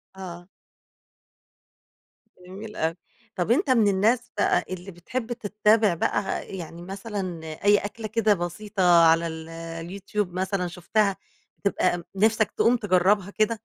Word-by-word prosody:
آه. 175 -2 -9 2.0
جميل 210 +3 -9
أوي، 160 +1 -1 0.4
طَب 180 +5 0
أنت 275 +3 +2
من 230 -5 +4
الناس 225 +6 +2
بقى - - +2
اللي 185 +1 -6
بتحب 230 +8 -4
تتابع 210 -2 +2
بقى 195 +4 -1
يعني 170 0 -8
مثلًا 190 -2 -5 0.2
أي 205 0 +6
أكلة 215 +2 -5
كده 220 0 +2
بسيطة 175 -1 +2
على 165 +1 +4
ال 160 0 -7
اليوتيوب 170 +4 -5
مثلًا 185 0 -1
شُفتها 195 +3 0 0.5
تبقى 180 -3 +1
نفسك 220 +1 +2
تقوم 240 +1 +3
تجربها 200 0 +2
كده؟ 215 +2 +1
195 Hz, 125 wpm, -25 LUFS, 175-215 Hz, 2.0 s, أي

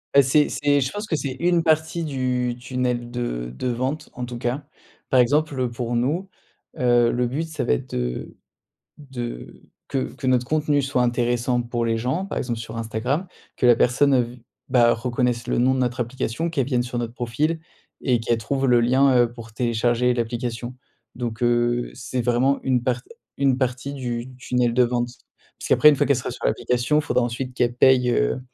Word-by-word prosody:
Heu, 140 - +9
c’est 145 +3 +3
c'est 145 -1 +2
je 130 - -1
pense 205 +1 -5
que 170 - 0
c'est 140 -3 -3
une 175 -1 +2
partie 160 +1 +1
du 125 -4 -1
tunnel 125 -1 -2
de - - -3
de 130 - -3
vente, 130 +5 -2
en 125 - -5
tout 120 -1 -7
cas. 125 +4 -3 0.4
Par 130 - +4
exemple, 145 +3 +2
heu, 125 -1 +1
pour 120 0 -3
nous, 155 +11 0 0.5
heu, 120 -1 +4
le 125 0 0
but 150 +7 -3
ça 155 -4 -4
va - - +2
être 60 - -3
de - - -3 0.6
de 120 - -7 0.3
que 135 -2 -2
que 135 - -6
notre 125 -1 +3
contenu 150 0 +1
soit 135 -2 +1
intéressant 120 0 +1
pour 120 0 -2
les 115 - +1
gens, 130 +12 -1
par - - -6
exemple, 120 -2 -3
sur 115 0 -7
Instagram. 115 - -2 0.3
Que - - -3
la 120 - +8
personne, 135 +4 +3
heu, 130 - +5
vi 120 0 -9 0.2
bah, 120 -2 +5
reconnaisse 120 0 -1
le - - 0
nom 125 +2 +4
de - - -1
notre 125 0 -1
application, 125 +6 -2
qu'elle 140 -6 0
vienne 125 -3 +1
sur 120 0 -4
notre 115 -1 -4
profil 140 +7 -1 0.4
et 125 -3 +2
qu'elle 115 +1 +1
trouve 135 +5 -1
le 120 -2 +5
lien, 130 +2 +4
heu, 120 -1 +3
pour 115 -2 -11
télécharger 120 +1 +1
l'application. 120 +1 -3 0.4
Donc, 120 -1 -5
heu, 120 0 +1
c'est 125 +1 -4
vraiment 125 +3 +2
une 125 -2 +1
part 125 0 0 0.4
une 135 -2 +3
partie 130 +2 -2
du 125 -1 -4
tunnel 125 -1 0
de 125 - +5
vente. 120 0 0 0.5
Puisqu'après, 150 - +5
une 150 - +6
fois, - - +2
qu'elle 140 - +3
sera 125 - -4
sur - - -8
l'application, 125 - +1
il - - +1
faudra 145 - +1
ensuite 125 +2 -4
qu'elle 120 -1 +1
paye, 125 -1 +4
heu, - - +1
125 Hz, 200 wpm, -23 LUFS, 120-135 Hz, 0.6 s, Heu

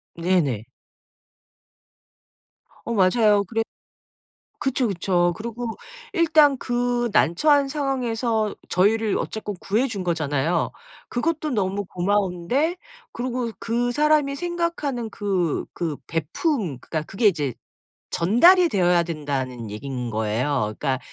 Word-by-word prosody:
네네. 165 - +1 2.2
어 235 - -2
맞아요 205 +1 +4
그랬 225 +2 -1 1.0
그쵸, 265 -2 0
그쵸. 175 -2 +1
그리고 235 +1 -5 0.4
일단 310 -5 +5
그 245 -1 0
난처한 280 - +4
상황에서 245 -6 -1
어 - - -10
저희를 210 +3 +2
어쨌건 210 -2 -4
구해 225 +7 +1
준 200 -6 -4
거잖아요. 160 -2 0 0.4
그것도 310 +4 -1
너무 200 -4 -1
고마운데 200 - 0 0.4
그리고 245 -1 -3
그 240 +1 0
사람이 295 0 +2
생각하는 335 -8 -2
그 190 -7 -1
그 160 -4 -3
베풂 195 - -1 0.2
그러니까 155 +3 -3
그게 205 +3 -2
이제 150 - +2 0.5
"전달이 335 - +5
되어야 180 - +3
된다."는 135 -8 -4
얘기인 125 +2 -5
거예요. 110 +1 -1
그러니까 135 -3 -1
210 Hz, 255 characters per minute, -23 LUFS, 170-250 Hz, 2.2 s, 일단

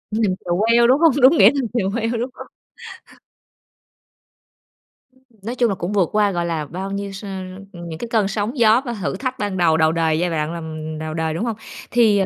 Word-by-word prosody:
Nằm 215 -4 +1
chèo 175 -1 0
queo, 235 +1 +5
đúng 260 +3 +4
hông? 330 -1 +6
Đúng 270 +6 +7
nghĩa 205 -2 +8
nằm 270 -4 -1
chèo 210 -6 0
queo 230 +1 -1
đúng 245 +3 -2
hông? - - -10 2.6
Ừm. 260 0 -30 0.2
Nói 235 +4 -4
chung 240 -2 +2
là 200 - -1
cũng 175 +1 -4
vượt 190 -5 +2
qua, 210 -1 +3
gọi 175 -2 -2
là, 165 -3 -2
bao 190 +6 -6
nhiêu 200 0 -4
s 195 +2 -9 0.5
ừm, 170 -1 -9
những 160 -1 -7
cái 235 - -5
cơn 215 -4 +2
sóng 210 +6 -3
gió 230 0 +5
và 240 - -3
thử 200 -3 -3
thách 255 +5 -4
ban 205 -2 -2
đầu, 165 -3 +3
đầu 160 -1 +3
đời, 160 -1 +1
giai 175 +1 0
đoạn 160 -1 -2
làm 155 -1 -6
đầu 155 0 -5
đời, 160 0 -2
đúng 170 +9 -2
hông? 230 -2 -2 0.4
Thì, 225 -4 +4
ờ, 195 - +2
200 Hz, 225 wpm, -20 LUFS, 170-235 Hz, 2.6 s, nghĩa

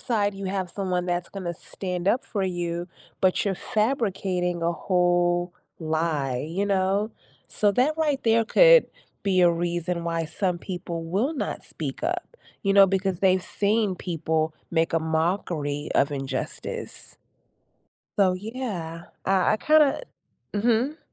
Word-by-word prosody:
side, 205 -5 0
you 195 0 -5
have 190 -2 -2
someone 180 -2 -2
that's 175 -1 -1
gonna 185 -3 -5
stand 180 +1 -5
up 245 - +2
for 200 - -2
you, 175 -1 -3 0.3
but 185 -1 +2
you're 200 -2 0 0.2
fabricating 190 -7 0
a 170 - +2
whole 175 0 +1 0.3
lie, 155 -5 -1
you 190 +5 -1
know? 195 +2 +1 0.4
So, 205 -1 +3
that 260 +8 +2
right 300 -4 0
there 225 0 +3
could - - +7 0.4
be 190 -2 +3
a 175 -1 +6
reason 170 0 -2
why 165 -1 -1
some 180 +3 -1
people 175 -2 -5
will 205 - 0
not 285 - -4
speak 150 - -6
up, 355 +7 -3 0.3
you 195 - +2
know, 195 0 +8
because 190 -1 0
they've 185 -1 +3
seen 205 -1 +1
people 160 -2 -1 0.2
make 165 -1 +1
a 165 - +2
mockery 160 -2 -1
of 140 +1 +3
injustice. 135 -1 -4 1.0
So, 190 -2 +5
yeah, 190 -7 -5 0.2
I 190 0 +3
I - - +2
kinda 305 - +4 0.5
Mhm. 235 +8 +1
185 Hz, 140 wpm, -25 LUFS, 170-205 Hz, 1.0 s, know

